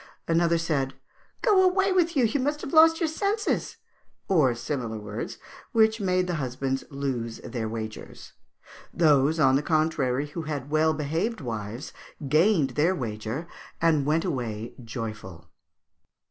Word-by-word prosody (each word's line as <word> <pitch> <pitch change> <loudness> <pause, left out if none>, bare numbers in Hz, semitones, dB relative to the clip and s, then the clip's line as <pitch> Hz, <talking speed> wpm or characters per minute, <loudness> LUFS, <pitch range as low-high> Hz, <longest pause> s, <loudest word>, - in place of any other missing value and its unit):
Another 170 0 +3
said, 145 -5 -1 0.5
'Go 415 -5 +5
away 380 +1 +3
with 345 -4 +2
you; 250 - +5
you 270 +6 0
must 295 +3 -1
have 275 - -6
lost 325 +1 +7
your 335 - +1
senses,' 405 +7 -1 0.5
or 150 -10 +3
similar 120 -2 -4
words, 105 0 -6 0.4
which 220 -1 +3
made 185 -1 +1
the 180 - -2
husbands 135 +1 -2
lose 130 -5 -3
their 115 -3 -4
wagers. 110 -1 -7 0.6
Those, 155 -1 +3
on 135 -2 +5
the - - 0
contrary, 150 -4 +1
who 165 +3 -5
had 145 -3 -5
well 155 0 +3
behaved 165 +10 -2
wives 115 -2 -5 0.3
gained 155 0 +3
their 165 +5 +2
wager 115 +4 -4 0.3
and 160 -3 +3
went 155 +4 +1
away 120 - -3
joyful." 110 -7 -7
150 Hz, 140 wpm, -26 LUFS, 125-185 Hz, 0.6 s, lost